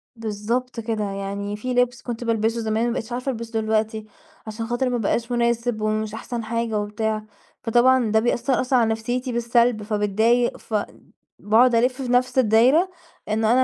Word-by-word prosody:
بالضبط 230 +3 -3
كده، 220 -1 -2
يعني 200 +1 -4
في 250 +4 -3
لِبس 245 -1 +1
كنت 240 -1 -5
بالبِسُه 225 0 0
زمان 220 +2 0
ما - - 0
بقِيتش 225 -1 -5
عارفة 255 +2 -2
ألبسُه 230 -1 -4
دلوقتي، 220 0 -1 0.4
عشان 225 +1 -5
خاطر 240 +2 0
ما 245 - 0
بقاش 230 +2 -1
مناسب 235 -1 0
ومش 215 0 -1
أحسن 230 +1 -5
حاجة 230 -1 -1
وبتاع، 215 +1 -2 0.4
فطبعًا 240 0 +3
ده 220 - +4
بيأثّر 240 +2 +1
أصلًا 255 0 +2
على 225 - +2
نفسيتي 245 +3 -2
بالسَلب 235 -1 +2
فباتضايق 220 +3 +1
فأ 210 -2 -2 0.5
باقعد 230 +4 +4
ألِفّ 250 +3 +1
في 260 - -3
نفس 250 +1 +2
الدايرة، 255 - +4 0.4
إنه 220 +1 +2
أنا 255 +2 +5
230 Hz, 165 wpm, -23 LUFS, 215-245 Hz, 0.5 s, أنا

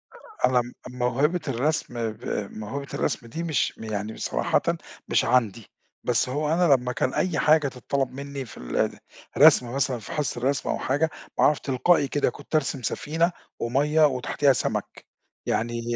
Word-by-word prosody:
أ 445 -3 -2
أنا 125 -1 +3
م 120 +1 -9 0.3
موهبة 135 +8 +1
الرسم 120 -3 -1
ب 110 - -14 0.3
موهبة 120 +7 -6
الرسم 120 - -2
دي 160 +9 -5
مش 160 -4 0
يعني 110 0 -4
صراحةً، - - 0 0.5
مش - - +2
عندي، 115 -4 +1 0.4
بس 125 +1 +1
هو 150 +4 0
أنا 170 -4 +5
لمّا 125 -1 +1
كان 125 +1 -1
أي 180 -4 0
حاجة 155 -1 +4
تتطلب 135 +1 -2
مني 140 0 -6
في - - -13
ال - - -1 0.4
الرسم 120 -1 +6
مثلًا، 130 -3 0
في - - -10
حصة 150 -5 -2
الرسم 135 +3 0
أو - - 0
حاجة، 145 +5 +1 0.3
أعرف 150 -1 +4
تلقائي 140 +3 +2
كده، 145 -1 +1
كنت 145 +5 -7
أرسم 135 -3 0
سفينة 165 +8 0 0.3
ومَيَّة 145 +6 +3
وتحتيها 135 +1 +2
سمك، - - -3 0.4
يعني 115 +1 -1
135 Hz, 160 wpm, -25 LUFS, 120-150 Hz, 0.5 s, الرسم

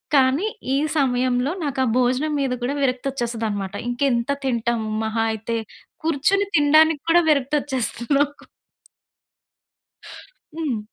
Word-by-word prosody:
కానీ, 270 +8 +3 0.3
ఈ - - +2 0.2
సమయంలో 255 -1 +1
నాకా 270 -2 -1
భోజనం 255 +5 +1
మీద 260 -2 0
కూడా 275 +4 -1
విరక్తొచ్చేస్తదనమాట. 235 -6 -2
ఇంకెంత 245 -1 0 0.2
తింటం! 235 -2 0 0.2
మహా 220 +1 -1
అయితే, 225 +1 -3 0.5
కూర్చుని 330 +6 +1
తినడానికి 310 +1 +4
కూడా 345 +1 +6
విరక్తొచ్చేస్తుంది 270 -4 0
నాకు. 290 0 -1 2.1
హ్మ్. 290 -9 -2
260 Hz, 100 wpm, -22 LUFS, 240-290 Hz, 2.1 s, కూడా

